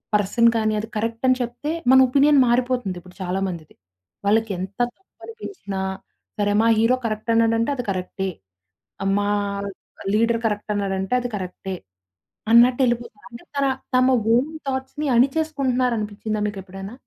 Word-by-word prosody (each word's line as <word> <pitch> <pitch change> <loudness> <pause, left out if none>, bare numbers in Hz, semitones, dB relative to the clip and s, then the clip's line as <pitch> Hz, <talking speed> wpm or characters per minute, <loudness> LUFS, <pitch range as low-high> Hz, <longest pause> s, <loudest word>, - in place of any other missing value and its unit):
Person 210 +3 +4
కాని, 215 -1 +1
అది 215 - -5
correct 230 +2 -3
అని 255 0 +4
చెప్తే, 245 +6 -3 0.2
మన 260 - +8
ఒపీనియన్ 280 +2 +4
మారిపోతుందిప్పుడు 235 -8 -1
చాలా 185 +1 -1
మందిది. 170 -4 -7 0.5
వాళ్ళకెంత 200 -3 0 0.2
తప్పనిపించినా, 385 - -8 0.6
సరే 205 0 +2
మా 230 - +3
హీరో 230 +3 +4
కరెక్ట్ 215 +1 -2
అన్నాడంటే 230 +1 +2
అది 245 -3 -4
కరెక్టే. 190 0 -2 0.9
మా 205 0 0 0.8
లీడర్ 230 +1 +2
కరెక్ట్ 210 -1 -1
అన్నాడంటే 195 +1 -2
అది 245 0 -3
కరెక్టే. 185 0 -5 0.8
అన్నట్టెళ్ళిపోతారు. 240 -2 +3
అంటే 235 - -11
తన 280 0 +1 0.3
తమ 255 0 +5 0.3
ఓన్ 275 +6 +1 0.2
థాట్స్‌ని 265 +3 -3
అణిచేసుకుంటున్నారనిపిచ్చిందా 250 -7 0
మీకెప్పుడైనా? 195 0 -7
230 Hz, 120 wpm, -22 LUFS, 200-255 Hz, 0.9 s, మన